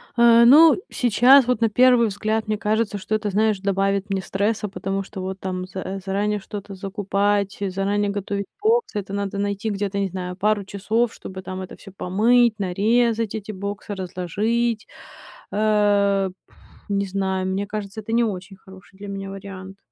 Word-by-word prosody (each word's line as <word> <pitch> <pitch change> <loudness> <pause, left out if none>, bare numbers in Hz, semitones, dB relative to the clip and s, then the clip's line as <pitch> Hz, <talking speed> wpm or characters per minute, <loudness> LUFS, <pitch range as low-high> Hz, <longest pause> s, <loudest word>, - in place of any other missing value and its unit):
Э, 235 0 +6
ну, 305 +5 +8
сейчас, 250 +2 +5
вот 250 -2 0
на 225 - +3
первый 245 +1 +5
взгляд, 215 +2 -2
мне 215 - 0
кажется, 210 0 0
что 205 +3 -2
это, 210 -1 -2
знаешь, 215 0 +1
добавит 195 +1 0
мне 195 -1 -1
стресса, 205 +3 -1
потому 195 0 -3
что 190 0 -8
вот 190 +1 -5
там 185 -1 -4
з 185 - -21
э, 190 +1 -4
заранее 205 +2 0
что-то 200 0 -8
закупать, 200 +1 -1
заранее 200 +1 -1
готовить 200 0 -3 0.2
боксы, 440 - +1
это 195 0 -7
надо 200 0 -3
найти 200 +2 -2
где-то, 200 -1 -2
не 195 - 0
знаю, 180 0 -5
пару 210 +1 +1
часов, 215 +4 -1
чтобы 190 0 -9
там 185 0 -6
это 185 - -8
всё 195 - -13
помыть, 225 +5 +3
нарезать, 220 +4 +1
эти 215 0 -5
боксы 200 +1 -5
разложить. 210 +5 -1 0.6
Э, 205 -2 +2 0.2
пф, - - -26 0.3
не 200 0 0
знаю, 190 -1 -1
мне 195 +2 -2
кажется, 210 0 -5
это 220 +2 -7
не 235 +1 +4
очень 195 -2 -4
хороший 190 0 -16
для 205 - -9
меня 195 0 -5
вариант. 195 -1 -9
200 Hz, 170 wpm, -22 LUFS, 195-215 Hz, 0.6 s, ну